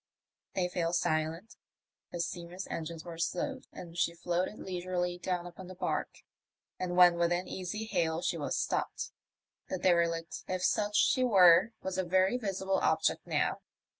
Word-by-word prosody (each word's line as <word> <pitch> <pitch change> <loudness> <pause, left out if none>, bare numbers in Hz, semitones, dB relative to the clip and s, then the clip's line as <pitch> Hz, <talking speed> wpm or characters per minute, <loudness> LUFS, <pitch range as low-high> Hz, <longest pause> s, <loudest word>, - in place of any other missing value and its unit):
They 180 -2 +1
fell 175 -1 -1
silent, 165 +6 -1 0.5
the 175 - -5
steamer's 175 +2 -4
engines 165 0 -5
were 170 -1 -8
slowed, 260 +10 -2
and 170 -1 -10
she 170 -1 +1
floated 175 +4 -1
leisurely 180 -1 -3
down 180 0 -2
upon 175 +1 -9
the 185 - -9
barque, - - -3 0.6
and 180 -1 -2
when 175 -1 +7
within 175 +1 +1
easy 190 +4 -4
hail 165 -5 0
she - - 0
was - - -2
stopped. - - -2 0.6
The 185 - -1
derelict, 170 -2 +1
if 185 -1 -2
such 210 +2 +1
she 255 - +4
were, 190 -2 +6
was 190 0 -2
a - - +2
very 185 +4 +3
visible 195 -4 -1
object - - +1
now. - - 0
180 Hz, 155 wpm, -31 LUFS, 170-190 Hz, 0.6 s, when